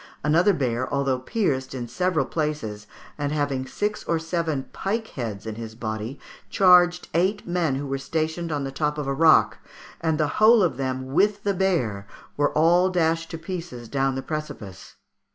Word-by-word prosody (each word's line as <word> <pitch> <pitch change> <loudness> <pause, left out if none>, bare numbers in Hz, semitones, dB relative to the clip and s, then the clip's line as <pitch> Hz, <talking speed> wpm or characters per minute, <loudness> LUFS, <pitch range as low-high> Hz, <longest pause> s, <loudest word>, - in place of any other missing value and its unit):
Another 165 +7 +4
bear, 130 -7 -1
although 135 -2 0
pierced 135 - -1
in 120 -2 -4
several 165 +2 0
places, 125 -11 -3 0.3
and 145 0 -1
having 140 -3 -1
six 210 +10 -2
or 165 - +1
seven 165 -4 -2
pike 220 +3 -2
heads 110 -6 -5
in 110 - -4
his 110 0 -8
body, 110 +3 -5 0.3
charged 180 -2 +5
eight 190 +5 +1
men 175 -5 0
who 140 +2 -3
were 135 0 -3
stationed 160 +3 -2
on 145 -2 -1
the 135 - -4
top 150 +2 -1
of 150 - -3
a 140 - -1
rock, 155 +2 +4 0.4
and 160 -2 +1
the 155 - +2
whole 220 -1 +7
of 150 -9 0
them 130 0 -3
with 205 +5 +2
the 200 - +1
bear 130 - 0 0.3
were 145 0 +1
all 175 +4 +4
dashed 165 -2 0
to 165 - -5
pieces 165 -8 -6
down 135 +1 0
the 135 - -4
precipice. 110 - -7
150 Hz, 175 wpm, -24 LUFS, 130-175 Hz, 0.4 s, whole